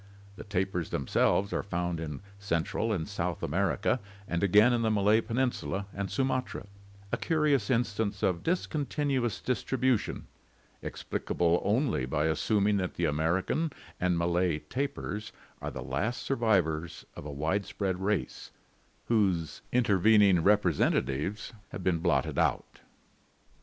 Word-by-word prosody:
The - - -8
tapirs 95 -4 -2
themselves 95 +8 +1
are - - 0
found 90 -3 -2
in 75 -1 -5 0.2
Cen 85 -5 0
tral 115 +6 -2
and 85 -7 -1
South 90 -4 -3
America - - +1 0.3
and 85 0 -1
again 105 +5 +5
in 120 - +1
the 110 - +2
Malay 105 +1 +4
Peninsula 115 -4 -1
and 100 -1 -3
Sumatra, 130 -4 -1 0.5
a - - +1
curious 150 -8 +1
instance 110 -4 0
of 90 -3 +1
discontinuous 140 - -1
distribution, 130 -1 0 0.6
explicable 85 0 -1
only 110 - +1
by 75 +4 0
assuming 100 +6 +2
that 90 -2 -2
the 85 - 0
American 85 - 0 0.3
and 90 -1 +1
Malay 85 -1 +1
tapirs 110 - -4 0.3
are - - -3
the - - -6
last 120 +4 -2
survivors 90 - 0
of - - -8
a 75 - -6
widespread 95 +5 -1
race, 100 +2 -2 0.6
whose 95 -8 +1
intervening 105 -5 +5
representatives 95 - +1 0.2
have 95 - -7
been 85 -3 +1
blotted 85 0 +1
out. - - 0
100 Hz, 125 wpm, -29 LUFS, 85-115 Hz, 0.6 s, again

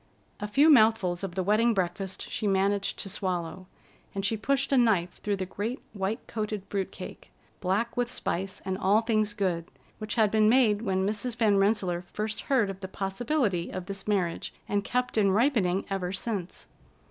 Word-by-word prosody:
A 210 - -3
few 275 +9 +4
mouthfuls 215 -8 +4
of 185 -3 -4
the 190 - 0
wedding 220 +4 +3
breakfast 190 +1 -2
she 215 - -2
managed 195 +1 +1
to - - -5
swallow, 185 -1 -3 0.5
and 195 0 -2
she 225 - +2
pushed 270 +5 0
a - - +4
knife 205 -8 +2
through 205 -1 0
the 190 -1 -3
great 215 +7 -4
white 205 +3 -3
coated 215 -2 -3
fruit 195 -2 -1
cake, - - -9 0.3
black 200 +6 0
with 245 -1 0
spice 190 -4 -2
and 190 0 -2
all 205 +3 +4
things 215 -2 0
good, 180 -5 -1 0.3
which 215 -1 -4
had 215 -3 +3
been 215 -1 +4
made 220 -4 +4
when 190 -3 0
Mrs. 215 +4 -2
Van 215 -4 +3
Rensselaer 195 -4 +1
first 215 0 -3
heard 235 -8 +3
of 190 - -10
the 190 - -6
possibility 195 - -1
of 185 -1 -5
this 195 +1 -6
marriage, 185 -5 -1
and 205 0 0
kept 250 -1 0
in 200 -2 +4
ripening 200 -4 +2
ever 185 -2 -1
since. 195 -2 -4
205 Hz, 180 wpm, -28 LUFS, 190-220 Hz, 0.5 s, few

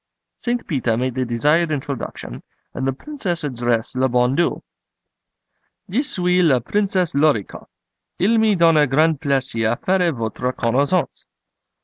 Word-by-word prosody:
St. 240 -1 -2
Peter 125 -7 -1
made 130 +1 -1
the 130 +1 -2
desired 150 +8 +1
introduction, 135 - -5 0.3
and 130 - -3
the - - +2
Princess 180 - -5
addressed 120 -3 -1
le 130 +1 +1
Bon 125 +1 +2
Dieu: 170 +2 0 1.3
'Je 235 +8 +2
suis 180 -9 +1
la 145 -7 +4
Princesse 190 - -1
Lor 145 -2 +3
i 100 - -6
koff. - - -13 0.5
Il 225 +5 +2
me 220 -2 +3
donne 165 -3 +4
grand 155 +2 +2
plaisir 130 -6 0
à - - -34
faire 180 -2 +1
votre 120 0 -3
connaissance. 140 +10 0
145 Hz, 145 wpm, -20 LUFS, 125-180 Hz, 1.3 s, la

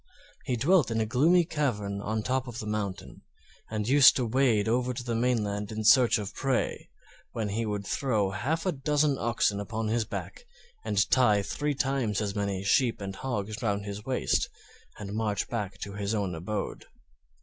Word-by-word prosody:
He 125 - 0
dwelt 145 +2 +3
in 115 -1 -1
a 110 - +1
gloomy 165 +10 +4
cavern 105 - -2
on 110 +2 -2
the 110 - -2
top 130 +2 -1
of 120 -2 -7
the 110 - -5
mountain, 105 -3 -4 0.5
and 110 -1 -3
used 140 +1 +7
to 125 - 0
wade 115 -3 +2
over 125 +2 0
to 120 - -5
the 120 -1 -3
mainland 110 -4 0
in 110 0 -4
search 120 +3 +6
of 105 -3 -5
prey, 135 -2 -1 0.4
when 110 -3 -2
he 110 +3 -2
would 105 -1 -3
throw 105 -5 0
half 140 - -2
a 185 - +2
dozen 145 -1 +1
oxen 110 -3 +1
upon 110 +2 -3
his 115 0 +1
back, 475 - -7 0.4
and 100 0 +1
tie 110 -6 +4
three 145 +7 -2
times 130 -7 0
as 100 -2 -2
many 100 -2 -2
sheep 120 +4 +2
and 95 -1 -6
hogs 110 -4 -4
round 100 -2 -1
his 100 +1 -6
waist, 130 +1 0 0.5
and 100 -1 -6
march 105 -2 -1
back 100 -5 -3
to 100 - -5
his 100 +1 -2
own 100 -4 -1
abode. 95 +5 -4
110 Hz, 185 wpm, -28 LUFS, 100-130 Hz, 0.5 s, used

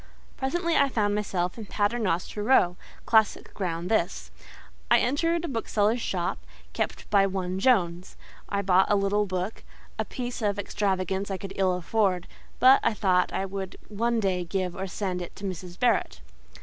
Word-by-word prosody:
Presently 335 +5 -1
I 280 -1 +4
found 210 -5 +1
myself 195 -2 -2
in 215 - -7
Paternoster 205 -3 -1
Row—classic 215 0 +2
ground 175 -3 -3
this. 170 - 0 0.6
I - - +7
entered 330 +6 +1
a - - -3
bookseller's 225 -3 0
shop, 175 -5 -2 0.3
kept - - -3
by 200 -1 +5
one 185 -1 -3
Jones: 185 -6 +1 0.3
I 200 0 -1
bought 185 0 +4
a 205 - +4
little 200 +1 +1
book—a 185 +3 -5
piece 245 -1 -5
of 205 -1 0
extravagance 195 -1 -1
I 195 - -2
could 195 0 -7
ill 190 -2 +2
afford; 180 0 0 0.3
but 260 +2 +7
I 215 - +1
thought 185 -4 +2
I 195 - -1
would 195 -1 -5
one 230 +2 0
day 185 -4 0
give 180 0 -2
or 190 +1 -4
send 185 -1 -3
it 175 - -8
to 205 - -12
Mrs. 180 -1 -6
Barrett. 235 - +1
195 Hz, 160 wpm, -27 LUFS, 185-220 Hz, 0.6 s, I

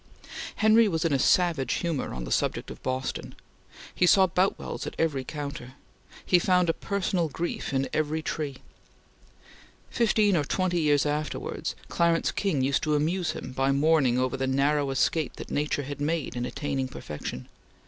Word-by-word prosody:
Henry 220 +1 +5
was 165 -4 -1
in 160 - +2
a 135 - +2
savage 160 -4 +2
humor 165 -6 -2
on 65 - -5
the - - -6
subject - - 0
of - - -10
Boston. 130 0 -3 0.6
He 180 - +3
saw 190 +1 +6
Boutwells 185 +2 -1
at - - -6
every 150 -5 0
counter. 140 -3 -6 0.5
He 180 - +5
found 180 -1 +3
a - - -7
personal 190 -4 -1
grief 170 +5 -3
in 135 0 0
every 155 +1 0
tree. 150 -3 -3 1.4
Fifteen 215 -4 +3
or 150 - +2
twenty 175 +3 0
years 145 -2 +3
afterwards, 150 0 -3
Clarence 170 -1 +2
King 165 -10 0
used 135 +1 +1
to 150 -1 +1
amuse 165 +4 0
him - - -7
by 135 +1 +1
mourning 140 -3 +3
over 130 0 0
the 135 0 -1
narrow 140 +2 +2
escape 145 +4 0
that - - -9
nature 145 0 -1
had 145 +1 -6
made 155 -1 -1
in 120 0 -2
attaining 140 -3 -2
perfection. 75 - -7
150 Hz, 165 wpm, -27 LUFS, 135-170 Hz, 1.4 s, saw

